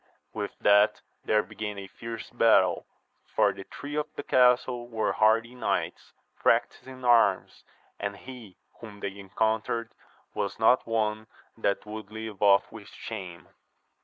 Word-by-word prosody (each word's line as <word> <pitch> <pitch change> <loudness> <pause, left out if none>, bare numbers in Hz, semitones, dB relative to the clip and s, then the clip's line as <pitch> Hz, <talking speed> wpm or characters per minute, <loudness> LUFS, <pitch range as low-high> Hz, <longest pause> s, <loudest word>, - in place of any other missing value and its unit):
With 105 -2 -5
that 105 +1 +5 0.3
there 105 0 +3
began 105 -1 -6
a 100 - -6
fierce 115 +4 -8
battle, - - +3 0.5
for - - +4
the 95 - -10
three 145 +1 -8
of 150 0 -1
the - - -5
castle 125 -1 +3
were 115 -2 -1
hardy 110 +2 +3
knights, 125 - -2 0.3
practised - - +1
in 130 -1 -9
arms, 115 -5 +3 0.4
and 100 0 -3
he 120 -7 -11 0.2
whom 105 -3 -11
they 100 -1 -4
encountered 110 +3 -1 0.4
was 100 -1 -3
not 115 +3 +4
one 110 -1 -1 0.3
that 100 -3 -1
would 105 -1 -8
leave 110 -2 -7
off 100 -1 +4
with 110 -2 -11
shame. 95 -6 -8
110 Hz, 140 wpm, -28 LUFS, 100-115 Hz, 0.5 s, that